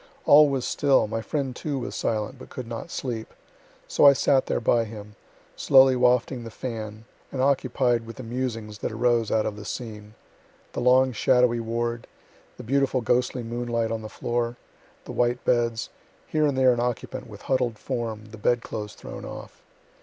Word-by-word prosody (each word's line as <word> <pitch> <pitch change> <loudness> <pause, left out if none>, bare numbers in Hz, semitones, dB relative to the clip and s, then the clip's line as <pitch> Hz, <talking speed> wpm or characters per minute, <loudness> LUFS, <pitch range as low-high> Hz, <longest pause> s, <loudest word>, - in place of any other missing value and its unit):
All 150 +1 +8
was 135 -3 -1
still, 140 -5 +3
my 115 +1 -3
friend 135 0 -3
too 145 0 -3
was 125 - -4
silent, 110 +3 -2
but - - -11
could 130 - -6
not 115 +7 -6
sleep; 120 -8 -5 0.5
so - - +1
I 140 -1 +10
sat 135 0 +2
there - - 0
by 115 0 +2
him, 105 -1 -10 0.4
slowly 130 -1 +6
wafting 125 0 +2
the 115 - -7
fan, 110 -2 -6 0.3
and 135 - -5
occupied 130 -3 +1
with 115 - -8
the 130 - -8
musings 115 -3 -4
that - - -3
arose 115 0 +1
out 110 -1 +1
of 105 - -3
the 105 - -8
scene, 105 -1 -7 0.6
the - - -3
long 130 +1 +5
shadowy 125 0 +3
ward, 115 +1 -3 0.5
the - - -8
beautiful 135 +1 +1
ghostly 125 +1 0
moonlight 115 -1 -2
on 115 -1 -2
the 110 - -7
floor, 120 +1 -2 0.5
the - - -7
white 120 0 0
beds, 120 -2 +1 0.3
here 155 -1 +1
and 140 -2 -1
there 130 -1 +5
an 120 - -3
occupant 120 -1 -3
with 105 -2 -12
huddled 125 -4 0
form, 115 -3 -4
the 110 - -10
bed 120 +2 +1
clothes 105 -1 -6
thrown - - -9
off. - - -9
120 Hz, 180 wpm, -25 LUFS, 115-130 Hz, 0.6 s, I